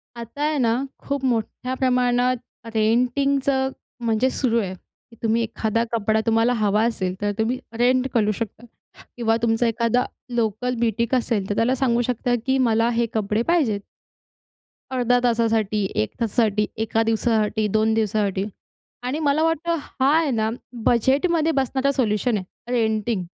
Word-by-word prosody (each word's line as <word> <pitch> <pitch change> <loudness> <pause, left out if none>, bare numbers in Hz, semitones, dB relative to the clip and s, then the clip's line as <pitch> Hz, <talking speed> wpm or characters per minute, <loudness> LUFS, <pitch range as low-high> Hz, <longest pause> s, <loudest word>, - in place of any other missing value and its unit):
आता 235 +4 -8
आहे 300 0 +1
ना, 240 +2 +1 0.2
खूप 280 -1 -3
मोठ्या 250 +1 -1
प्रमाणात 250 -1 +2 0.4
रेंटिंगचं 265 +4 +2 0.4
म्हणजे 230 +3 +2
सुरू 235 -3 +1
आहे, 190 -2 -4
की 230 +5 -20
तुम्ही 225 +1 +2
एखादा 225 0 -1
कपडा 220 -1 +1
तुम्हाला 225 +1 +3
हवा 210 +1 +2
असेल, 185 -6 -1
तर 205 0 +1
तुम्ही 230 +3 0 0.2
रेंट 255 +2 +3
करू 215 -3 +2
शकता 230 +1 -5 0.5
किंवा 225 -1 +2
तुमचा 230 +1 +2
एखादा 230 +2 +1 0.3
लोकल 235 +2 0
ब्युटीक 235 +1 +1
असेल, 225 -5 -1
तर 205 - 0
त्याला 235 +4 +2
सांगू 240 -2 +1
शकता 245 0 0
की 265 0 +2
मला 225 +1 +2
हे 235 - +2
कपडे 215 0 0
पाहिजेत, 285 -12 +2 1.1
अर्ध्या 245 -1 +2
तासासाठी, 225 -3 +1
१ 110 0 0
तासासाठी, 215 -2 +1
एका 225 0 0
दिवसासाठी, 220 -1 +1
२ 220 +2 +2
दिवसासाठी 205 -3 0 0.6
आणि 255 +4 -2
मला 300 0 +2
वाटतं 325 +1 +1
हा, 275 +3 +1
आहे 320 -3 +1
ना, 220 -3 0 0.3
बजेटमध्ये 300 +7 +2
बसणारा 270 0 +1
सोल्युशन 225 -3 +1
आहे, 205 +5 -8
रेंटिंग. 220 -4 0
235 Hz, 145 wpm, -23 LUFS, 220-255 Hz, 1.1 s, तुम्हाला